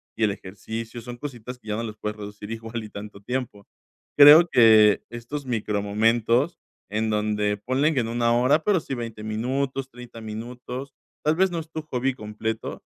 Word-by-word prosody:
y 110 Hz, -, -1 dB
el 105 Hz, -, +3 dB
ejercicio, 110 Hz, +5 st, -7 dB
son 120 Hz, +1 st, -8 dB
cositas 125 Hz, -2 st, -7 dB
que -, -, -19 dB
ya 105 Hz, -, -1 dB
no 115 Hz, -, -3 dB
les 110 Hz, -1 st, -6 dB
puedes 105 Hz, 0 st, -4 dB
reducir 105 Hz, 0 st, -8 dB
igual 115 Hz, 0 st, -5 dB
y 105 Hz, -, -9 dB
tanto 100 Hz, 0 st, -9 dB
tiempo. 120 Hz, -3 st, -4 dB, 0.5 s
Creo 150 Hz, +4 st, +10 dB
que 110 Hz, -6 st, +6 dB
estos 125 Hz, +5 st, -6 dB
micromomentos, 115 Hz, +5 st, +1 dB, 0.3 s
en 110 Hz, +2 st, -1 dB
donde 105 Hz, -1 st, 0 dB
ponle 135 Hz, +8 st, +1 dB
que 125 Hz, -, +1 dB
no 115 Hz, +1 st, -4 dB
1 120 Hz, 0 st, +2 dB
hora, 140 Hz, +6 st, +3 dB
pero 205 Hz, -4 st, +3 dB
sí, 135 Hz, -4 st, -5 dB
20 115 Hz, -3 st, -6 dB
minutos, 130 Hz, +5 st, -2 dB
30 120 Hz, -1 st, -11 dB
minutos. 125 Hz, +4 st, -7 dB, 0.3 s
Tal 155 Hz, +1 st, +2 dB
vez 190 Hz, +1 st, +3 dB
no 170 Hz, -, -2 dB
es 160 Hz, 0 st, -8 dB
tu 155 Hz, -1 st, -5 dB
hobby 130 Hz, -2 st, -1 dB
completo, 110 Hz, 0 st, -5 dB
115 Hz, 180 wpm, -25 LUFS, 105-130 Hz, 0.5 s, Creo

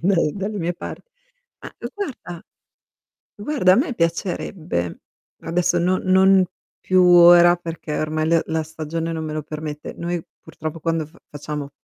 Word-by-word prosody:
dal 180 Hz, -1 st, +3 dB
dalle 205 Hz, +1 st, -4 dB
mie 170 Hz, -1 st, -1 dB
par -, -, -7 dB, 0.6 s
Ah, -, -, -9 dB
l -, -, -4 dB
guarda 235 Hz, -, -6 dB, 1.0 s
guarda 205 Hz, -4 st, +2 dB
a -, -, +6 dB
me 260 Hz, 0 st, 0 dB
piacerebbe, 165 Hz, -, -2 dB, 0.4 s
adesso 170 Hz, +1 st, +1 dB
no 185 Hz, +2 st, +1 dB
non 190 Hz, 0 st, +5 dB, 0.4 s
più 185 Hz, -1 st, +3 dB
ora 175 Hz, 0 st, +8 dB
perché 165 Hz, -3 st, -6 dB
ormai 155 Hz, 0 st, -1 dB
l 165 Hz, 0 st, +4 dB
la 160 Hz, 0 st, -1 dB
stagione 160 Hz, +1 st, -4 dB
non 160 Hz, -1 st, -4 dB
me 155 Hz, -, -4 dB
lo 155 Hz, 0 st, -3 dB
permette. 150 Hz, 0 st, -7 dB
Noi 170 Hz, 0 st, -3 dB, 0.2 s
purtroppo 155 Hz, +1 st, -7 dB
quando 165 Hz, -1 st, -1 dB
f 155 Hz, -, -23 dB
facciamo, 145 Hz, -1 st, -6 dB
170 Hz, 150 wpm, -21 LUFS, 155-185 Hz, 1.0 s, ora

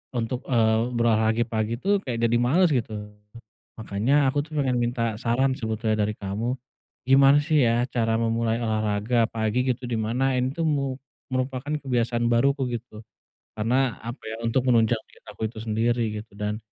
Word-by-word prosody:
untuk, 120 Hz, +2 st, -2 dB
eee, 110 Hz, -3 st, +3 dB, 0.2 s
berolahraga 110 Hz, 0 st, +2 dB
pagi 110 Hz, +1 st, -1 dB
tuh 200 Hz, +1 st, +2 dB
kayak 115 Hz, -3 st, -3 dB
jadi 115 Hz, 0 st, +3 dB
males, 165 Hz, +9 st, +3 dB
gitu. 120 Hz, -4 st, -1 dB, 0.9 s
Makanya 125 Hz, +7 st, +1 dB
aku 145 Hz, +1 st, -1 dB
tuh 155 Hz, -, -18 dB
pengen 130 Hz, -2 st, +1 dB
minta 120 Hz, -2 st, 0 dB
saran 130 Hz, +3 st, +1 dB
sebetulnya 110 Hz, -1 st, -1 dB
dari 105 Hz, -, -1 dB
kamu, 105 Hz, +5 st, -2 dB, 0.6 s
gimana 135 Hz, +1 st, +6 dB
sih, 145 Hz, -3 st, +2 dB
ya, 120 Hz, +1 st, +2 dB
cara 115 Hz, -2 st, 0 dB
memulai 115 Hz, 0 st, 0 dB
olahraga 110 Hz, +1 st, +1 dB
pagi, 110 Hz, +2 st, 0 dB
gitu, 125 Hz, 0 st, -8 dB
di 115 Hz, -, -1 dB
mana 125 Hz, +4 st, 0 dB
ini 130 Hz, +1 st, 0 dB
tuh 165 Hz, +1 st, -2 dB
mu 140 Hz, -3 st, -1 dB, 0.3 s
merupakan 130 Hz, +2 st, -2 dB
kebiasaan 120 Hz, -3 st, 0 dB
baruku, 135 Hz, +3 st, +2 dB
gitu? 110 Hz, -2 st, -11 dB, 0.6 s
Karena 125 Hz, +3 st, +1 dB
apa, 120 Hz, +3 st, -7 dB
ya, 110 Hz, +1 st, -5 dB
untuk 125 Hz, +3 st, +1 dB
menunjang 115 Hz, -1 st, +4 dB
diet -, -, -23 dB
aku 110 Hz, -, -4 dB
itu 110 Hz, -1 st, -9 dB
sendiri, 110 Hz, -1 st, 0 dB
gitu, 110 Hz, -, -28 dB
dan, 105 Hz, 0 st, -2 dB
120 Hz, 165 wpm, -25 LUFS, 110-130 Hz, 0.9 s, gimana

